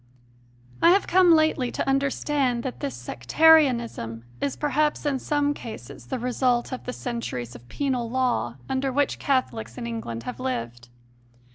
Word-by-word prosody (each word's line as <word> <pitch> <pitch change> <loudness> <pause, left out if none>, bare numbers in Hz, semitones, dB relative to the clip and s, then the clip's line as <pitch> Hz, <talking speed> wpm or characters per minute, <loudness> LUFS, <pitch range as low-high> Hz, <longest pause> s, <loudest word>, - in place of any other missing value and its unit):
I - - +7
have 390 +3 +4
come 365 -1 +5
lately 310 -5 +2
to - - -2
understand 270 -2 0
that 260 - -5
this 135 -3 -3
Sec 125 0 -9
tarianism 240 - +4 0.2
is 280 - -1
perhaps 300 +1 0
in 280 -2 0
some 290 +1 0
cases 125 - -9
the - - -2
result 245 0 0
of 255 - -6
the 250 - -3
centuries 230 - -5
of 120 0 -14
penal 255 -5 -1
law 245 - 0
under 265 0 -1
which 285 +2 0
Catholics 115 - -1
in - - -5
England 115 0 -5
have 250 - -6
lived. 120 - -4
250 Hz, 155 wpm, -25 LUFS, -, 0.2 s, I